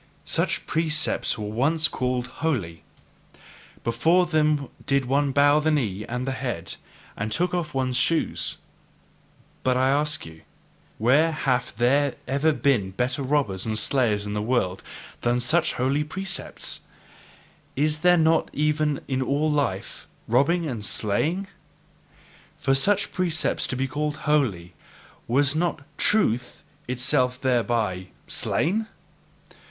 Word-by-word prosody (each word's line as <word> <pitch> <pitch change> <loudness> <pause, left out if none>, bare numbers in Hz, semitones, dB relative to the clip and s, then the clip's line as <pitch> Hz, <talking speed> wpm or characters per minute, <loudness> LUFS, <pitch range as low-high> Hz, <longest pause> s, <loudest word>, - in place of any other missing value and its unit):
such - - 0
precepts 155 -5 0
were 105 - -4
once 140 +10 +2
called 125 -3 -1 0.2
holy; 110 - -1 1.0
before 160 +11 +3
them 155 -4 +1 0.2
did 140 -1 +2
one 140 +2 +1
bow 145 +2 +5
the 155 +1 +1
knee 110 -10 0
and 125 +2 -3
the - - 0
head, 120 -11 -3 0.4
and 110 +2 -3
take 180 +8 +1
off 165 -5 -2
one's 130 -2 +1
shoes. 85 - +1 1.0
But 130 -1 +1
I 130 +1 +3
ask 150 +1 0
you: 80 0 -12 0.6
Where 140 +9 +4
have 130 -5 -1
there 140 +3 +2
ever 140 +4 +2
been 135 -10 +1
better 125 +9 -2
robbers 130 -9 0
and 110 -1 -1
slayers 110 -3 +1
in 105 - -4
the 105 - -1
world 105 -5 0 0.4
than 120 +1 +1
such 155 +8 +2
holy 135 +4 +1
precepts? 190 +5 -4 1.0
Is 150 +2 +1
there 180 +2 +5
not 160 0 +3
even 150 0 +1
in 130 -1 -1
all 145 +4 +1
life 140 -11 -2 0.2
robbing 150 +8 +2
and 120 -7 -4
slaying? 150 - -1
And - - -23 1.1
for 135 +1 +1
such 185 +10 +1
precepts 170 -4 0
to - - -3
be 135 +1 -1
called 150 +2 -2
holy, 105 - +1 0.5
was 140 +4 +3
not 165 -3 -1 0.2
TRUTH 125 - +1 0.2
itself 125 0 +1
thereby 115 -8 0 0.2
slain? 215 +7 0
135 Hz, 130 wpm, -25 LUFS, 120-155 Hz, 1.1 s, bow